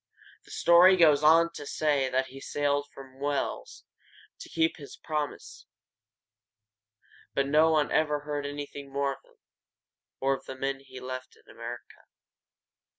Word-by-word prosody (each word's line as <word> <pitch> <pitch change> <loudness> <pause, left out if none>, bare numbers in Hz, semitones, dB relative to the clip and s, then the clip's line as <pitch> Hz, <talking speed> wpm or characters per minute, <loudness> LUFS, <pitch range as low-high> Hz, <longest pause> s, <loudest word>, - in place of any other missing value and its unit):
The - - -19
story 180 +2 +6
goes 155 -4 +5
on 165 +2 +5
to - - -8
say 145 -4 +1
that 130 +1 +1
he 135 +1 -11
sailed 145 0 -1
from 135 -1 -13
Wales 145 0 -3 0.6
to - - -10
keep 165 0 0
this 140 -2 -11
promise, 150 -2 -5 1.7
but 140 - +2
no 155 +3 +4
one 155 -2 +2
ever 150 -1 +1
heard 145 -1 -4
anything 145 -1 -7
more 140 0 0
of - - -16
him, - - -27 0.8
or 135 +1 +2
of 135 - -6
the 130 - -7
men 135 +1 -3
he 130 -1 -12
left 130 0 -7
in - - -26
America. 120 +1 -10
145 Hz, 150 wpm, -28 LUFS, 135-150 Hz, 1.7 s, story